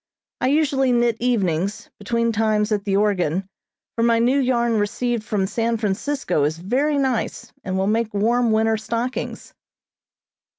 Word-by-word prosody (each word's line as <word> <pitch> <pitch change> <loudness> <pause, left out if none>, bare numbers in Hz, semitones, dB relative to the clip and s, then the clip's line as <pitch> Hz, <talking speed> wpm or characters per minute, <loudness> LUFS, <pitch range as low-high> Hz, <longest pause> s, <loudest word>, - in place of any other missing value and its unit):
I - - +1
usually 275 -2 +2
knit 240 -1 +2
evenings, 205 -3 -1
between 230 +3 0
times 215 -1 +1
at 205 -2 0
the 195 -1 +1
organ, 190 -3 0 0.5
for 230 - -1
my 230 0 +3
new 250 +4 +3
yarn 240 -4 +1
received 235 +2 -1
from 205 -3 -1
San 230 +3 -1
Francisco 215 - -1
is 155 +2 0
very 260 - 0
nice, 260 -4 -2
and 185 0 -2
will 190 - +1
make 220 +2 0
warm 235 +4 +1
winter 220 0 +2
stockings. 235 +3 -4
225 Hz, 145 wpm, -22 LUFS, 205-245 Hz, 0.5 s, my